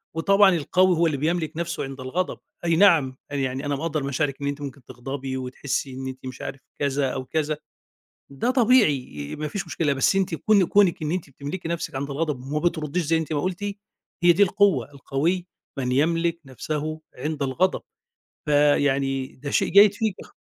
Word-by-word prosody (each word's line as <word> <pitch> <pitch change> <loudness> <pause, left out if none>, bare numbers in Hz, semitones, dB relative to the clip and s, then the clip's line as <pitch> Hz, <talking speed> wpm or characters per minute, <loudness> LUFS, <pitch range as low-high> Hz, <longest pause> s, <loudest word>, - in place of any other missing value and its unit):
وطبعًا 195 +3 +5
القوي 180 +3 +3
هو 170 - +3
اللي 150 -3 -1
بيملك 160 +1 0
نفسه 170 0 -2
عند 135 0 -7
الغضب. 165 +9 -2 0.3
أي 170 -1 +3
نعم، 160 -8 +4
يعني 135 0 -2
أنا 145 0 0
مقدّر 155 0 -2
مشاعرِك 140 +1 -2
إن 140 - -1
أنتِ 145 +1 -3
ممكن 140 -1 -7
تغضبي 130 +1 -5
وتحسي 130 +1 -3
إن 130 0 -6
أنتِ 130 0 -8
مش 130 - -7
عارف 135 - -6 0.2
كذا 140 -1 +1
أو 130 - -4
كذا. 155 +2 -1 0.7
ده 140 - -1
طبيعي، 155 - +2
آآ، - - -5
ما 150 0 -3
فيش 195 +2 -4
مشكلة. 155 -3 0
بس 135 +8 +2
أنتِ 190 -3 +1
كون 200 +2 +3
كونِك 190 -4 +3
إن 155 +1 -1
أنتِ 175 -6 -3
بتملكي 145 +6 -6
نفسِك 170 -3 -3
عند 140 +2 -3
الغضب 150 -2 -2
وما 140 +4 -3
بترديش 170 -1 0
زي 165 +2 +2
أنتِ 160 0 -4
ما 145 - 0
قُلتِ، 185 +1 -3 0.6
هي 175 0 +7
دي 190 +4 +3
القوة. 200 -5 +3
القوي 160 +6 -1 0.3
من 125 -1 -1
يملك 165 +4 +1
نفسه 155 +4 -4 0.2
عند 150 +2 -3
الغضب. 170 +8 +1 0.6
فيعني 140 -2 +2
ده 140 +2 -6
شيء - - +2
جيّد 200 +1 +7
فيكِ 215 -2 -1
خا - - -19
150 Hz, 185 wpm, -24 LUFS, 135-175 Hz, 0.7 s, هي